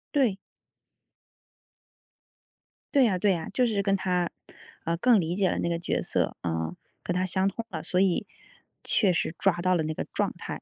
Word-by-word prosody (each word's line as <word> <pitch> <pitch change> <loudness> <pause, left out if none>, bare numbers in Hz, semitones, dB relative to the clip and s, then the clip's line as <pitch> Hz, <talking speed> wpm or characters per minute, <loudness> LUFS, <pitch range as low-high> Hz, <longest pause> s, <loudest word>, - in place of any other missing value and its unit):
对。 250 -9 +3 2.6
对 270 -4 +6
啊， 190 -4 +1
对 195 +1 +3
啊， 160 -2 -5
就 250 - +3
是 215 -4 +1
跟 195 0 +2
他， 180 -2 0 0.6
呃， 165 - +1
更 235 +4 +5
理 170 0 -1
解 190 -1 +2
了 - - -1
那 - - 0
个 170 - 0
角 170 - -1
色， - - -1
呃， 80 0 -2 0.3
跟 175 - -1
他 185 +1 +1
相 190 +1 +1
通 225 +4 -3
了， 160 -5 -5
所 180 +2 +1
以 190 -2 +2 0.6
确 200 -4 +3
实 165 -1 -1
抓 195 -3 +2
到 185 +1 +2
了 165 - +1
那 155 0 -2
个 - - -4
状 - - 0
态。 - - -6
185 Hz, 200 characters per minute, -27 LUFS, 170-200 Hz, 2.6 s, 对